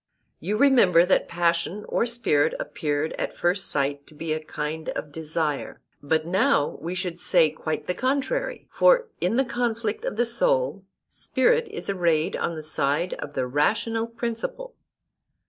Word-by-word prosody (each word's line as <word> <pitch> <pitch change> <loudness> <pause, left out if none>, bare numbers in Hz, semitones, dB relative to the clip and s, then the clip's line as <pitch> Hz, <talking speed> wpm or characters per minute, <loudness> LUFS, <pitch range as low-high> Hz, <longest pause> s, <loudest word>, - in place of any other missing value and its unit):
You 205 +6 -2
remember 220 -10 +5
that 185 - +2
passion 170 +3 0
or 235 - 0
spirit 230 -12 +1
appeared 150 +1 -2
at - - -3
first 180 +3 +1
sight 140 0 -1
to 155 - -17
be 155 +1 -3
a 155 0 -4
kind 155 +1 -4
of 150 - -5
desire, 155 -1 -2 0.2
but 155 +2 0
now 175 -4 +1
we 170 +4 -4
should 180 -2 -3
say 165 -5 +3
quite 155 0 -4
the 180 - -1
contrary; 285 - -1
for - - +4
in 180 +6 +1
the 265 +2 +3
conflict 230 -3 -2
of - - -3
the 240 +2 +2
soul - - +1 0.2
spirit 475 -1 +1
is 430 +1 -7
arrayed 170 -5 +1
on 170 - -2
the 155 - -6
side 155 +3 +1
of 145 - -6
the 130 - 0
rational 215 - 0
principle. 235 - -5
180 Hz, 160 wpm, -25 LUFS, 155-235 Hz, 0.2 s, remember